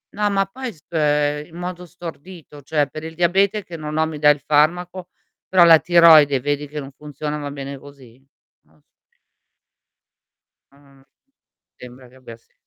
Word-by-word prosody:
no, 210 0 0
ma 195 0 +1
poi 245 +3 -8
spe 150 -2 -1
in 165 - -13
modo 180 0 -6
stordito, 170 -3 -11
cioè 145 -1 0
per 155 +2 -10
il 160 0 -8
diabete 195 +4 +1
che 170 - -10
non 155 0 -6
ho 160 - +2
mi 155 -2 -7
dà 150 0 +5
il 145 - -2
farmaco, 175 +4 0 0.4
però 185 -2 +4
la 165 -1 +8
tiroide 160 -5 +5
vedi 145 +2 -3
che 150 +1 -7
non 135 0 -9
funziona, 150 +1 -6
va 145 -1 -6
bene 140 0 -7
così? 135 -2 -17 0.4
Non 75 0 -31 0.3
si - - -45 1.6
Ah-ah. 140 -1 -23 0.7
Sembra 125 0 -13
che 125 - -23
abbia 115 -3 -13
se - - -38
150 Hz, 165 wpm, -20 LUFS, 140-175 Hz, 1.6 s, la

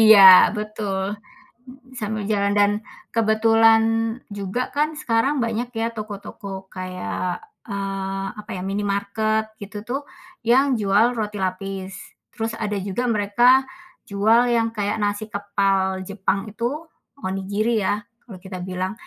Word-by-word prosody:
Iya, 215 -2 +9 0.3
betul. 210 -2 -3 1.0
Sambil 215 -1 -3
jalan 200 -1 +1
dan 205 0 +5 0.4
kebetulan 225 0 +5 0.6
juga, 200 +5 -2
kan 300 +1 +2
sekarang 230 +5 +1
banyak 230 +2 -2
ya, 225 - +1
toko-toko 205 -1 -7 0.2
kayak, 185 -1 -3 0.4
eee, 195 -1 -3
apa 210 - -9
ya - - -5
minimarket, 205 +2 0 0.2
gitu 205 +1 -7
tuh, 270 +3 -1 0.5
yang 265 +3 +6 0.2
jual 200 +2 +4
roti 210 -1 -3
lapis. 190 +1 -5 0.4
Terus 225 0 -3
ada 210 - -2
juga 200 +6 -2
mereka 210 +4 +3 0.6
jual 215 +4 +4 0.2
yang 225 0 +2
kayak, 205 -1 0
nasi 205 +1 -1
kepal 200 -1 +1 0.3
Jepang 195 0 0
itu 235 +3 -1 0.6
onigiri 200 +4 -1
ya, 205 - +2 0.3
kalau 205 -6 -10
kita 190 -1 -6
bilang. 185 +1 -2
205 Hz, 125 wpm, -22 LUFS, 195-220 Hz, 1.0 s, Iya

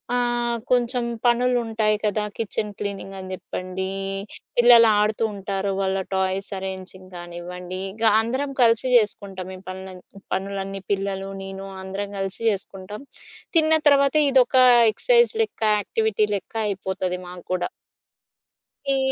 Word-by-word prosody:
ఆహ్, 240 -1 +1
కొంచెం 245 0 +2 0.2
పనులుంటాయి 235 -3 +2
కదా! 210 0 +1
కిచెన్ 210 -1 -2
క్లీనింగ్ 200 -1 -5
అని 185 - -8
జెప్పండి, 185 0 -5 0.7
పిల్లలు 240 -1 +8
ఆడుతూ 215 +1 +1
ఉంటారు, 195 0 -2
వాళ్ళ 195 0 0
టాయ్స్ 190 +1 -1
అరేంజింగ్ 190 -1 -7
కానివ్వండి, 175 +1 -7
ఇక 225 +2 -6 0.2
అందరం 260 +5 -1
కలిసి 230 +1 +4
జేసుకుంటాం. 195 -4 0
ఈ - - -10
పనులన్ 185 -1 -8 0.3
పనులన్నీ 195 0 -3
పిల్లలు, 195 -1 -2
నేను 195 0 -7 0.2
అందరం 200 +1 -5
కలిసి 195 0 -4
చేసుకుంటాం. 195 +2 -5 0.6
తిన్న 315 0 +4
తర్వాత 280 0 +4
ఇదొక 260 -1 +3 0.4
ఎక్సర్‌సైజ్ 475 - +3
లెక్క, 420 - -6 0.2
యాక్టివిటీ 215 +1 0
లెక్క 200 +3 -7
అయిపోతది 190 -2 -3
మాకు 180 -1 -10
కూడా. 180 -1 -1 1.2
ఈ - - +1
200 Hz, 120 wpm, -23 LUFS, 190-235 Hz, 1.2 s, పిల్లలు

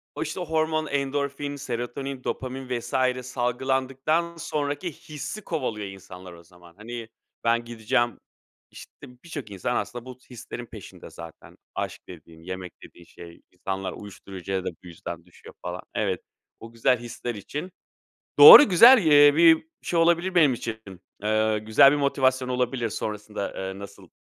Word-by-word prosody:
o, - - -2
işte, 160 +4 -5
hormon, 155 -1 -1
endorfin, 140 +1 -2
serotonin, 130 +1 -5
dopamin 130 -1 -4
vs. 120 0 -10 0.3
salgılandıktan 135 +6 -1
sonraki 145 +2 -3
hissi 155 +8 -8
kovalıyor 115 - -3
insanlar 95 -2 -11
o 85 - -15
zaman. 85 0 -19
Hani, 115 +1 -8 0.3
ben 115 0 +1
gideceğim 120 0 -1 0.5
işte, - - -13 0.3
birçok 145 -9 -8
insan 100 +6 -3
aslında 120 0 -4
bu 130 -1 -10
hislerin 120 0 -8
peşinde 110 -5 -12
zaten. 85 -1 -13 0.2
Aşk - - -4
dediğin, 80 -1 -14
yemek 95 0 -7
dediğin 85 - -15
şey. 85 0 -14
İnsanlar 95 +1 -5
uyuşturucuya 95 -1 -7
da - - -1
bu 90 +2 -18
yüzden 85 0 -8
düşüyor, 90 - -16
falan. - - -6
Evet, - - -1 0.4
o 115 - -11
güzel 120 +2 +1
hisler 120 0 -6
için. 150 - -7 0.7
Doğru, 435 - +12
güzel, 235 +9 +8
eee, 145 -1 +7
bir 165 - +6 0.2
şey 170 - -1
olabilir 170 +2 +2
benim 150 -7 +5
için. 115 -1 -5 0.5
Eee, 110 0 +1
güzel 110 +6 +5
bir - - +1
motivasyon 130 -2 +1
olabilir 125 -1 -1
sonrasında, 105 -1 -5
eee, 95 0 -5
nasıl 100 0 -12
120 Hz, 145 wpm, -25 LUFS, 100-145 Hz, 0.7 s, Doğru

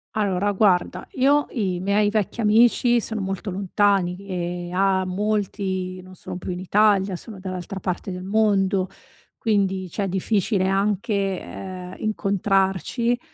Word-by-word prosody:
Allora 205 -1 +1
guarda, 185 -3 +2
io 285 +3 +3
i 185 -6 -1
miei 205 +2 +2
vecchi 215 +2 -1
amici 235 +2 +4
sono 220 -1 -3
molto 195 +1 -3
lontani 195 -1 +1
che 180 -2 -4
a 190 0 +2
molti 190 -2 -2
non 185 0 -14
sono 180 - -7
più 185 - -5
in 180 - -4
Italia, 195 0 +3
sono 205 +2 -9
dall'altra 185 0 -5
parte 185 +2 -3
del 180 0 -6
mondo, 195 -2 +2 0.5
quindi 195 -4 0
cioè, 200 - -1
è - - -2
difficile 195 +1 +1
anche, 200 +3 0 0.3
ehm, 180 - -8
incontrarci. 200 - 0
195 Hz, 135 wpm, -23 LUFS, 185-210 Hz, 0.5 s, amici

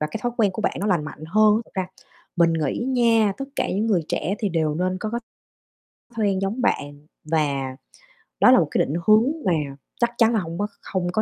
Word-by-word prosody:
và 150 - 0
cái 225 - -4
thói 240 -1 -1
quen 215 -4 +3
của - - -5
bạn - - +1
nó 205 - -1
lành 175 -7 +1
mạnh 155 0 -9
hơn. 215 +4 +4
Thật - - -23
ra 190 -1 -1 0.5
mình 170 -1 +4
nghĩ 155 -4 -1
nha, 230 -5 +3
tất 275 - -3
cả - - 0
những 205 +4 0
người 195 -7 +2
trẻ 190 +5 -1
thì 210 - 0
đều 160 -3 0
nên 185 +2 -1
có 215 - -3
cái 235 +1 -2 1.0
quen 200 -3 +1
giống 210 +6 -2
bạn 145 -10 -2 0.2
và 140 -4 -1 0.6
đó - - +7
là - - +7
một - - +1
cái - - 0
định 145 - -4
hướng 215 +1 +7 0.2
mà 185 - +3 0.5
chắc 235 -1 +2
chắn 230 0 +4
là 220 - +2
hông 170 -2 -5
có 205 - 0
kh - - -29 0.2
hông 180 -2 0
có 215 +4 +1
190 Hz, 235 wpm, -23 LUFS, 160-215 Hz, 1.0 s, đó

